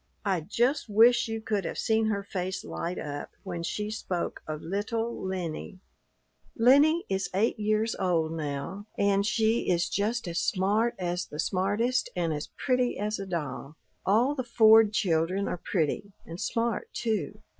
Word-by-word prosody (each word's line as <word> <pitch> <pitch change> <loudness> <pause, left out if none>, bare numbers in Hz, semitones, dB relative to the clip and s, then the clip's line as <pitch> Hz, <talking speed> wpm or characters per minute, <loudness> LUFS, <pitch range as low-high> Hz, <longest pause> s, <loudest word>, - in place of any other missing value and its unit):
I 190 -4 +1
just 240 - 0
wish 235 +4 +5
you 225 0 -3
could 210 -3 -1
have - - -4
seen 220 0 +2
her 200 -2 -1
face 190 -1 -4
light 175 +2 -4
up 145 -1 -5
when 175 -4 -4
she 210 +5 -3
spoke 185 -5 -3
of 155 0 -5
little 225 +6 -2
Lennie. 185 0 -4 0.8
"Lennie 285 +8 +5
is 195 0 -1
eight 215 +3 +1
years 215 +1 +1
old 165 -4 +1
now, 155 +6 -4
and 200 0 +3
she 220 +2 +1
is 175 -1 +2
just 215 +1 -1
as 170 0 -1
smart 210 +5 +1
as 180 -1 -2
the 150 - -9
smartest 205 +7 +1
and 170 -3 0
as 150 0 -4
pretty 250 -2 0
as 210 +1 -2
a 195 - -5
doll. 150 -4 -4 0.3
All 235 +8 +3
the 265 -3 -3
Ford 220 -2 +6
children 185 0 +1
are 175 - -4
pretty, 190 +3 -1
and 165 +2 -8
smart, 230 -1 -1
too. 215 -10 -2
200 Hz, 160 wpm, -28 LUFS, 175-225 Hz, 0.8 s, Ford